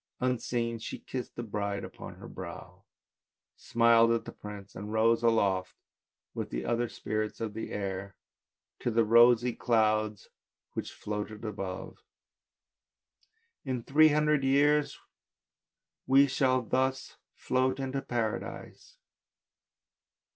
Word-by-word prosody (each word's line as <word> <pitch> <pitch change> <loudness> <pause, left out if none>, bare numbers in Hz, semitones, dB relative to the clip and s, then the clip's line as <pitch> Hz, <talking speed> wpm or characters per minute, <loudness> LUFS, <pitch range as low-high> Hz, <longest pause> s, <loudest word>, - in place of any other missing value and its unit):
Unseen 120 -2 -1
she - - -6
kissed 125 -2 -6
the 120 - -4
bride 100 -2 -3
on - - -8
her - - -11
brow, - - -9 0.7
smiled 115 0 +4
at 115 -1 0
the - - -7
prince 105 -1 -10
and 105 +2 -6
rose 115 +1 +3
aloft 100 -5 +1 0.6
with - - -4
the - - -4
other 120 0 0
spirits 110 0 -3
of 110 -2 -3
the 110 - -5
air 100 -1 -4 0.6
to - - -1
the 115 0 +3
rosy 120 +2 +5
clouds 110 -3 +1 0.4
which - - -4
sailed 105 +1 -5
above. 95 -3 -5 0.8
" - - -64 0.7
In 130 -4 -3
three 155 +5 +5
hundred 150 -1 +2
years 145 +2 +3 1.1
we 135 +2 +6
shall 130 -2 +1
thus 130 +3 -1 0.2
float 130 +1 0
into 135 0 -2
Paradise." 115 -4 -4
115 Hz, 120 wpm, -30 LUFS, 105-130 Hz, 1.1 s, we